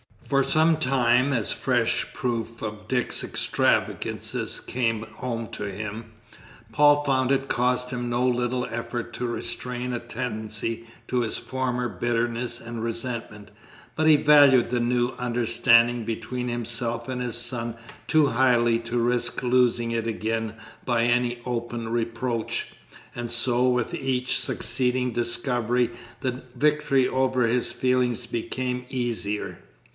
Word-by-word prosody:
For 140 Hz, 0 st, +3 dB
some 160 Hz, +1 st, +3 dB
time, 125 Hz, -1 st, +3 dB
as 110 Hz, -8 st, 0 dB
fresh -, -, 0 dB
proof 115 Hz, -2 st, -3 dB
of 105 Hz, -1 st, -6 dB
Dick's 125 Hz, 0 st, 0 dB
extravagances -, -, -1 dB
came 115 Hz, -3 st, -1 dB
home 115 Hz, 0 st, -5 dB
to -, -, -5 dB
him, 110 Hz, +3 st, -6 dB, 0.6 s
Paul 145 Hz, 0 st, +5 dB
found 130 Hz, -2 st, +1 dB
it 135 Hz, 0 st, +1 dB
cost 125 Hz, +1 st, +1 dB
him 120 Hz, -1 st, -3 dB
no 120 Hz, +1 st, +1 dB
little 125 Hz, 0 st, 0 dB
effort 120 Hz, +1 st, -5 dB
to 125 Hz, -, -2 dB
restrain 125 Hz, +1 st, -3 dB
a 120 Hz, -, -1 dB
tendency 115 Hz, -1 st, -4 dB, 0.2 s
to 125 Hz, -, +1 dB
his 115 Hz, -2 st, -1 dB
former 125 Hz, -2 st, -2 dB
bitterness 120 Hz, 0 st, -1 dB
and 115 Hz, -1 st, -6 dB
resentment, 115 Hz, -3 st, -5 dB, 0.4 s
but 155 Hz, 0 st, +2 dB
he 155 Hz, -, +8 dB
valued 145 Hz, -5 st, +6 dB
the 125 Hz, -, +1 dB
new 120 Hz, 0 st, +1 dB
understanding 120 Hz, 0 st, +3 dB
between 115 Hz, +2 st, -3 dB
himself 120 Hz, 0 st, -1 dB
and 125 Hz, -1 st, -3 dB
his 120 Hz, -2 st, -2 dB
son 120 Hz, -1 st, -2 dB, 0.3 s
too 155 Hz, -2 st, +4 dB
highly 120 Hz, -2 st, +3 dB
to 115 Hz, +1 st, -4 dB
risk 120 Hz, +1 st, +1 dB
losing 120 Hz, -2 st, +2 dB
it 115 Hz, -1 st, -1 dB
again 110 Hz, 0 st, -2 dB, 0.3 s
by 120 Hz, -2 st, +2 dB
any 120 Hz, 0 st, +1 dB
open 120 Hz, -1 st, -3 dB
reproach, 115 Hz, 0 st, -2 dB, 0.5 s
and 120 Hz, -1 st, -5 dB
so 120 Hz, +1 st, +2 dB
with 125 Hz, -2 st, 0 dB
each 130 Hz, -1 st, 0 dB
succeeding 125 Hz, +1 st, 0 dB
discovery 120 Hz, 0 st, 0 dB, 0.3 s
the 130 Hz, -1 st, -2 dB
victory 150 Hz, -3 st, +2 dB
over 130 Hz, -1 st, +1 dB
his 120 Hz, 0 st, 0 dB
feelings 125 Hz, -1 st, +1 dB
became 125 Hz, +2 st, -3 dB
easier. 115 Hz, -5 st, -3 dB
120 Hz, 130 wpm, -25 LUFS, 115-125 Hz, 0.6 s, he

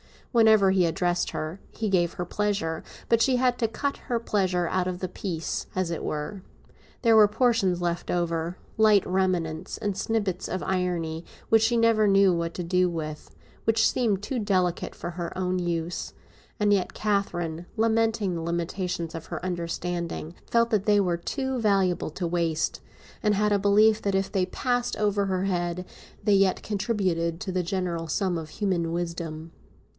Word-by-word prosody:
Whenever 220 Hz, -5 st, +5 dB
he 185 Hz, -2 st, +3 dB
addressed 175 Hz, +2 st, 0 dB
her 155 Hz, +5 st, -4 dB
he 220 Hz, -2 st, -2 dB
gave 175 Hz, -3 st, +2 dB
her 180 Hz, -, -3 dB
pleasure; 195 Hz, -4 st, -1 dB, 0.3 s
but 230 Hz, -1 st, +4 dB
she 255 Hz, +3 st, +4 dB
had 250 Hz, -1 st, +2 dB
to 225 Hz, -, +2 dB
cut 280 Hz, +5 st, -2 dB
her 240 Hz, -, -2 dB
pleasure 190 Hz, -6 st, 0 dB
out 185 Hz, -1 st, 0 dB
of 180 Hz, -1 st, -3 dB
the 185 Hz, -, -3 dB
piece, 170 Hz, -3 st, -4 dB
as 185 Hz, -2 st, 0 dB
it 165 Hz, -, -3 dB
were. 150 Hz, +6 st, -4 dB, 0.6 s
There 225 Hz, -2 st, +5 dB
were 210 Hz, -1 st, +8 dB
portions 215 Hz, -5 st, +2 dB
left 175 Hz, 0 st, -2 dB
over, 170 Hz, 0 st, -1 dB, 0.2 s
light 215 Hz, -3 st, +5 dB
remnants 180 Hz, -3 st, -1 dB
and 205 Hz, -3 st, -2 dB
snippets 200 Hz, -3 st, -1 dB
of 185 Hz, 0 st, -3 dB
irony, 175 Hz, -3 st, -1 dB, 0.2 s
which 225 Hz, -1 st, +5 dB
she 225 Hz, +2 st, +3 dB
never 230 Hz, -2 st, +4 dB
knew 195 Hz, -1 st, +5 dB
what 170 Hz, 0 st, -2 dB
to 180 Hz, -, -3 dB
do 180 Hz, +1 st, +2 dB
with, 155 Hz, -3 st, -6 dB, 0.3 s
which 225 Hz, 0 st, +4 dB
seemed 210 Hz, -6 st, 0 dB
too 250 Hz, +4 st, -2 dB
delicate 185 Hz, -4 st, 0 dB
for 175 Hz, -, -5 dB
her 170 Hz, 0 st, -5 dB
own 185 Hz, 0 st, 0 dB
use; 170 Hz, -1 st, -3 dB, 0.5 s
and 205 Hz, 0 st, +4 dB
yet 190 Hz, -3 st, 0 dB
Catherine, 175 Hz, -5 st, -1 dB
lamenting 225 Hz, -3 st, +1 dB
the 165 Hz, -, -3 dB
limitations 170 Hz, 0 st, -2 dB
of 165 Hz, -1 st, -6 dB
her -, -, -5 dB
understanding, 170 Hz, -1 st, -3 dB, 0.2 s
felt 235 Hz, 0 st, +3 dB
that 210 Hz, -2 st, +1 dB
they 205 Hz, -1 st, +4 dB
were 180 Hz, -3 st, +1 dB
too 265 Hz, -, -3 dB
valuable 195 Hz, -6 st, +2 dB
to 175 Hz, +3 st, -4 dB
waste 165 Hz, -2 st, 0 dB, 0.4 s
and 210 Hz, -2 st, +2 dB
had 210 Hz, +1 st, +2 dB
a 205 Hz, -, +3 dB
belief 210 Hz, +2 st, +4 dB
that 200 Hz, -1 st, 0 dB
if 195 Hz, 0 st, 0 dB
they 190 Hz, -3 st, +1 dB
passed 245 Hz, +5 st, -1 dB
over 205 Hz, -1 st, +1 dB
her 185 Hz, -1 st, -1 dB
head 175 Hz, -1 st, -1 dB, 0.4 s
they 210 Hz, -, +3 dB
yet 195 Hz, -1 st, +3 dB
contributed 185 Hz, -6 st, -1 dB
to 190 Hz, -, -3 dB
the 185 Hz, 0 st, 0 dB
general 175 Hz, -2 st, -2 dB
sum 180 Hz, +2 st, 0 dB
of 160 Hz, -1 st, -6 dB
human 175 Hz, -4 st, -1 dB
wisdom. 165 Hz, -2 st, -4 dB
185 Hz, 175 wpm, -26 LUFS, 170-210 Hz, 0.6 s, were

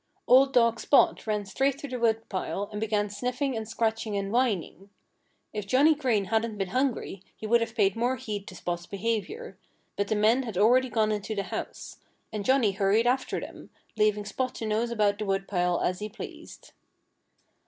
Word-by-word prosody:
Old 265 Hz, +2 st, +6 dB
dog 230 Hz, -2 st, +3 dB
Spot 275 Hz, -, +3 dB
ran 210 Hz, -1 st, -1 dB
straight 270 Hz, +7 st, 0 dB
to 285 Hz, -, -7 dB
the 250 Hz, -2 st, -5 dB
woodpile 220 Hz, -3 st, -1 dB
and 210 Hz, 0 st, -5 dB
began 210 Hz, -1 st, 0 dB
sniffing 250 Hz, +6 st, -2 dB
and 220 Hz, -1 st, -4 dB
scratching 225 Hz, -2 st, -1 dB
and 200 Hz, 0 st, -3 dB
whining. 205 Hz, -5 st, -1 dB, 0.6 s
If 210 Hz, -2 st, -4 dB
Johnnie 280 Hz, +8 st, +5 dB
Green 250 Hz, -9 st, 0 dB
hadn't 220 Hz, +1 st, -1 dB
been 195 Hz, -2 st, -2 dB
hungry 255 Hz, -5 st, -1 dB
he -, -, -8 dB
would 235 Hz, +2 st, +3 dB
have 230 Hz, 0 st, -3 dB
paid 200 Hz, -4 st, +3 dB
more 240 Hz, +3 st, +1 dB
heed 210 Hz, -6 st, -5 dB
to 185 Hz, -, -9 dB
Spot's 175 Hz, 0 st, -4 dB
behavior. 230 Hz, -, -3 dB, 0.4 s
But 200 Hz, 0 st, -1 dB
the 215 Hz, -, 0 dB
men 220 Hz, +5 st, +3 dB
had 225 Hz, -7 st, -5 dB
already 250 Hz, +6 st, +4 dB
gone 215 Hz, -1 st, +1 dB
into 210 Hz, +1 st, -3 dB
the 200 Hz, -, -1 dB
house. -, -, -6 dB, 0.3 s
And 210 Hz, -1 st, -3 dB
Johnnie 260 Hz, -3 st, +3 dB
hurried 200 Hz, +4 st, +2 dB
after 255 Hz, +2 st, 0 dB
them, -, -, -10 dB, 0.3 s
leaving 210 Hz, -1 st, +2 dB
Spot 255 Hz, +4 st, -3 dB
to 225 Hz, -, -5 dB
nose 220 Hz, +2 st, 0 dB
about 210 Hz, -3 st, +1 dB
the 215 Hz, -, -2 dB
woodpile 195 Hz, -3 st, 0 dB
as 180 Hz, 0 st, 0 dB
he 210 Hz, -, -4 dB
pleased. 225 Hz, -, -10 dB
220 Hz, 185 wpm, -27 LUFS, 205-245 Hz, 0.6 s, Old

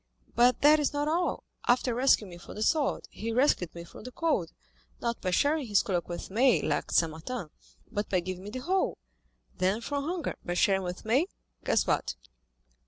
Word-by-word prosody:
But 245 Hz, +1 st, +4 dB
that 300 Hz, +2 st, +7 dB
is 295 Hz, 0 st, 0 dB
not 290 Hz, +1 st, 0 dB
all—after 285 Hz, -7 st, 0 dB
rescuing 235 Hz, -5 st, +3 dB
me 175 Hz, -, -10 dB
from -, -, -11 dB
the 215 Hz, -, -2 dB
sword, 300 Hz, +3 st, +1 dB
he 230 Hz, +2 st, -4 dB
rescued 225 Hz, -, +2 dB
me 170 Hz, -, -7 dB
from 170 Hz, -, -12 dB
the 255 Hz, -, -8 dB
cold, 250 Hz, -, 0 dB, 0.5 s
not 235 Hz, -1 st, -2 dB
by 185 Hz, -, -1 dB
sharing 285 Hz, -, +2 dB
his 205 Hz, -2 st, +3 dB
cloak 180 Hz, -4 st, -2 dB
with 175 Hz, +2 st, -6 dB
me, 245 Hz, +4 st, +4 dB
like -, -, -1 dB
St. 165 Hz, -2 st, +3 dB
Martin, 165 Hz, +2 st, -6 dB, 0.4 s
but 210 Hz, -2 st, -2 dB
by 185 Hz, -, +2 dB
giving 185 Hz, +1 st, -5 dB
me 205 Hz, -, -7 dB
the 255 Hz, +4 st, -5 dB
whole; 375 Hz, +7 st, 0 dB, 0.6 s
then 190 Hz, +4 st, +2 dB
from 280 Hz, +4 st, -3 dB
hunger 345 Hz, 0 st, -3 dB
by 175 Hz, -, -3 dB
sharing 195 Hz, +1 st, +3 dB
with 180 Hz, +1 st, -6 dB
me—guess 250 Hz, -, 0 dB
what?" -, -, 0 dB
230 Hz, 185 wpm, -29 LUFS, 185-285 Hz, 0.6 s, that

